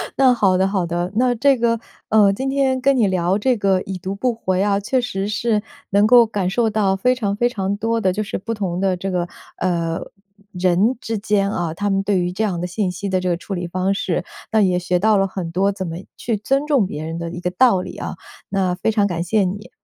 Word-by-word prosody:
那 265 Hz, -2 st, +5 dB
好 195 Hz, -6 st, +3 dB
的 190 Hz, +1 st, +2 dB
好 195 Hz, -3 st, 0 dB
的， 175 Hz, +2 st, -2 dB
那 250 Hz, +2 st, +3 dB
这 270 Hz, +3 st, +3 dB
个， 230 Hz, -1 st, +1 dB, 0.3 s
呃， 210 Hz, -2 st, +5 dB
今 265 Hz, +6 st, -2 dB
天 270 Hz, -1 st, +1 dB
跟 275 Hz, +2 st, +3 dB
你 230 Hz, -5 st, +3 dB
聊 185 Hz, 0 st, +1 dB
这 245 Hz, +3 st, +1 dB
个 195 Hz, -2 st, +2 dB
已 190 Hz, 0 st, -5 dB
读 190 Hz, +2 st, -5 dB
不 245 Hz, +4 st, 0 dB
回 190 Hz, -5 st, -1 dB
啊， 200 Hz, 0 st, +2 dB
确 250 Hz, +6 st, 0 dB
实 195 Hz, -5 st, -3 dB
是 215 Hz, 0 st, 0 dB, 0.3 s
能 200 Hz, +1 st, +4 dB
够 240 Hz, 0 st, +7 dB
感 205 Hz, -4 st, -2 dB
受 225 Hz, +3 st, +1 dB
到 205 Hz, -3 st, +1 dB
非 250 Hz, +7 st, +2 dB
常 210 Hz, -6 st, -2 dB
非 240 Hz, +3 st, +2 dB
常 195 Hz, -4 st, -2 dB
多 230 Hz, +2 st, 0 dB
的 190 Hz, -4 st, +1 dB
就 215 Hz, +3 st, -2 dB
是 205 Hz, -, -4 dB
不 230 Hz, +4 st, -4 dB
同 190 Hz, -5 st, -3 dB
的 190 Hz, -1 st, +1 dB
这 190 Hz, +2 st, -4 dB
个， 175 Hz, -1 st, -1 dB, 0.3 s
呃， 170 Hz, -2 st, -1 dB, 0.5 s
人 185 Hz, +6 st, +2 dB
之 225 Hz, -1 st, -3 dB
间 200 Hz, -1 st, +1 dB
啊， 175 Hz, -5 st, -2 dB
他 205 Hz, +5 st, -2 dB
们 195 Hz, 0 st, +1 dB
对 195 Hz, -1 st, +1 dB
于 175 Hz, 0 st, -1 dB
这 190 Hz, +5 st, -2 dB
样 190 Hz, -5 st, -1 dB
的 180 Hz, -, -2 dB
信 185 Hz, +1 st, -1 dB
息 190 Hz, +3 st, -5 dB
的 185 Hz, -1 st, +1 dB
这 185 Hz, -, -3 dB
个 175 Hz, -, +2 dB
处 185 Hz, +3 st, -7 dB
理 175 Hz, -2 st, -3 dB
方 185 Hz, +2 st, 0 dB
式， 185 Hz, -4 st, -1 dB, 0.3 s
那 220 Hz, -, +3 dB
也 185 Hz, -3 st, +3 dB
学 180 Hz, 0 st, 0 dB
到 215 Hz, +2 st, +3 dB
了 195 Hz, 0 st, +2 dB
很 185 Hz, -3 st, -5 dB
多 195 Hz, +4 st, +2 dB
怎 190 Hz, -2 st, -5 dB
么 165 Hz, 0 st, -5 dB, 0.2 s
去 230 Hz, -2 st, -2 dB
尊 270 Hz, +8 st, 0 dB
重 280 Hz, -8 st, +3 dB
别 155 Hz, -4 st, -5 dB
人 165 Hz, +1 st, -4 dB
的 170 Hz, 0 st, -4 dB
一 175 Hz, -, -6 dB
个 180 Hz, -, -1 dB
道 195 Hz, -1 st, +4 dB
理 -, -, -8 dB
啊， -, -, -5 dB, 0.3 s
那 185 Hz, -2 st, 0 dB
非 185 Hz, +5 st, 0 dB
常 210 Hz, -2 st, +2 dB
感 170 Hz, -3 st, -2 dB
谢 205 Hz, +4 st, +2 dB
你。 200 Hz, +3 st, -4 dB
195 Hz, 270 characters per minute, -20 LUFS, 180-220 Hz, 0.5 s, 够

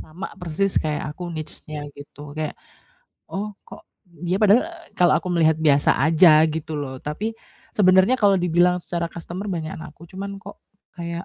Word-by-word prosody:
sama 170 Hz, +5 st, -8 dB
persis 180 Hz, +3 st, 0 dB
kayak 150 Hz, -1 st, -3 dB
aku 175 Hz, +2 st, -7 dB
niche-nya, 155 Hz, -2 st, -6 dB
gitu. 145 Hz, 0 st, -11 dB
Kayak, 155 Hz, -1 st, -3 dB, 0.7 s
oh 205 Hz, +1 st, -4 dB
kok -, -, -14 dB, 0.2 s
d 175 Hz, -1 st, -5 dB
dia -, -, +2 dB
padahal, 210 Hz, +4 st, +6 dB
e 340 Hz, -, -8 dB, 0.3 s
kalau 180 Hz, -, +5 dB
aku -, -, -6 dB
melihat 160 Hz, -2 st, +4 dB
biasa 145 Hz, -3 st, +4 dB
saja 155 Hz, +1 st, +6 dB
gitu 160 Hz, 0 st, -5 dB
loh, 135 Hz, -3 st, -4 dB
tapi 200 Hz, -, -4 dB, 0.4 s
sebenarnya 190 Hz, +3 st, +5 dB
kalau 200 Hz, -2 st, +4 dB
dibilang 180 Hz, 0 st, +3 dB
secara 170 Hz, -1 st, -2 dB
customer 175 Hz, +4 st, -7 dB
banyakan 165 Hz, 0 st, -4 dB
aku 155 Hz, +2 st, -18 dB
cuman 200 Hz, +1 st, -6 dB
kok 200 Hz, -, -11 dB, 0.4 s
kayak, 170 Hz, +1 st, -5 dB
170 Hz, 165 wpm, -23 LUFS, 155-190 Hz, 0.7 s, padahal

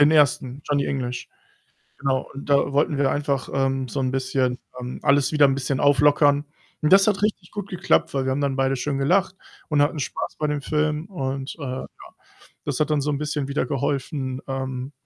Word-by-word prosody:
Den 145 Hz, +1 st, +7 dB
1. 140 Hz, -3 st, +2 dB
Johnny 145 Hz, -1 st, +1 dB
English. 125 Hz, -3 st, -3 dB, 0.7 s
Genau 135 Hz, -2 st, 0 dB
und 140 Hz, +1 st, -9 dB
da 140 Hz, 0 st, +3 dB
wollten 145 Hz, +1 st, +2 dB
wir 135 Hz, -1 st, +2 dB
einfach, 140 Hz, -2 st, -1 dB
ähm, 135 Hz, -1 st, 0 dB
so 135 Hz, -, -4 dB
'n 130 Hz, -1 st, 0 dB
bisschen, 130 Hz, -1 st, 0 dB, 0.2 s
ähm 125 Hz, 0 st, -6 dB
alles 140 Hz, -2 st, +3 dB
wieder 150 Hz, -2 st, +5 dB
'n 135 Hz, -, +2 dB
bisschen 135 Hz, 0 st, -2 dB
auflockern, 145 Hz, 0 st, +4 dB, 0.4 s
und 150 Hz, -, +1 dB
das 195 Hz, +1 st, +7 dB
hat 205 Hz, -2 st, +2 dB
richtig 200 Hz, -4 st, -1 dB
gut 205 Hz, -1 st, -6 dB
geklappt, 180 Hz, -, +1 dB
weil 135 Hz, -1 st, 0 dB
wir 130 Hz, -, +1 dB
haben 135 Hz, +2 st, -1 dB
dann 140 Hz, -1 st, 0 dB
beide 135 Hz, 0 st, +2 dB
schön 140 Hz, +2 st, -2 dB
gelacht 180 Hz, +8 st, +2 dB, 0.3 s
und 150 Hz, -2 st, +3 dB
hatten 150 Hz, +2 st, +1 dB
Spaß 135 Hz, -, -4 dB
bei 155 Hz, -, 0 dB
dem 150 Hz, -1 st, -1 dB
Film 150 Hz, +2 st, 0 dB
und, 135 Hz, -7 st, -4 dB
äh, -, -, -9 dB
ja. 130 Hz, -1 st, -4 dB, 0.8 s
Das 145 Hz, -2 st, -2 dB
hat 155 Hz, 0 st, +1 dB
dann 150 Hz, -1 st, +2 dB
so 145 Hz, +2 st, -1 dB
'n 145 Hz, -, -1 dB
bisschen 150 Hz, -2 st, -2 dB
wieder 140 Hz, -, -1 dB
geholfen, 135 Hz, -2 st, -2 dB
ähm 130 Hz, 0 st, -4 dB
140 Hz, 205 wpm, -23 LUFS, 135-150 Hz, 0.8 s, Den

